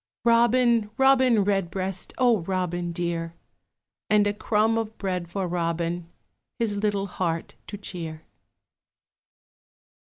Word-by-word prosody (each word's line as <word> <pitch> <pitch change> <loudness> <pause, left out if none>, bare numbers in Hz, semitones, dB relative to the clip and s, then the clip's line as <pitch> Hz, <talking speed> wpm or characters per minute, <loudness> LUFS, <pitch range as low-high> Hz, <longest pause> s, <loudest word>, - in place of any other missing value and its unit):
Robin, 235 -1 +4
Robin 260 -5 +5
Redbreast, 190 -1 -2
O 245 -4 +4
Robin 175 -1 -2
dear! 170 -1 -3 0.7
And 210 -1 +4
a 205 - +1
crumb 215 +2 +1
of 225 -1 -3
bread 180 -3 -3
for 190 +1 -2
Robin, 170 0 -2 0.5
His 225 -3 0
little 200 -1 0
heart 170 -4 -3
to 205 - -6
cheer. 165 -5 -6
195 Hz, 105 wpm, -25 LUFS, 175-220 Hz, 0.7 s, Robin